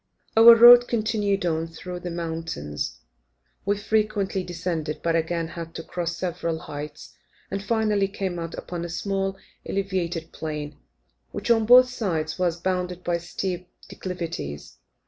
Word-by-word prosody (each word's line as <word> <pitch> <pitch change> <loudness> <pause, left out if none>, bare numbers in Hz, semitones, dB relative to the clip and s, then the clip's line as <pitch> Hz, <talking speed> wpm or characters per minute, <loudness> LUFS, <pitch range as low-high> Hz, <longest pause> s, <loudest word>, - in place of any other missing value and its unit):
Our 230 +1 +10
road 240 +1 +9
continued 210 -4 0
on 165 -1 0
through 175 +2 -7
the 175 - -5
mountains. 160 - -4 0.7
We 205 0 +2
frequently 210 -2 0
descended, 165 -3 -3
but 165 -1 +1
again 165 0 -1
had 165 -1 -8
to 165 - -5
cross 175 0 -3
several 170 -2 -2
heights, 150 -1 -8 0.4
and, 195 - -2
finally, 210 -2 +1
came 190 -3 -4
out 165 0 -5
upon 175 -1 -5
a 170 - -5
small 195 +2 -2 0.3
elevated 180 -4 -2
plain, 150 -2 -5 0.5
which, - - -2
on 225 -2 +3
both 250 +1 +9
sides, 170 -10 -2
was 175 -2 0
bounded 180 0 -2
by 175 -1 0
steep 180 +1 -4 0.2
declivities. 170 - -6
175 Hz, 140 wpm, -25 LUFS, 165-200 Hz, 0.7 s, Our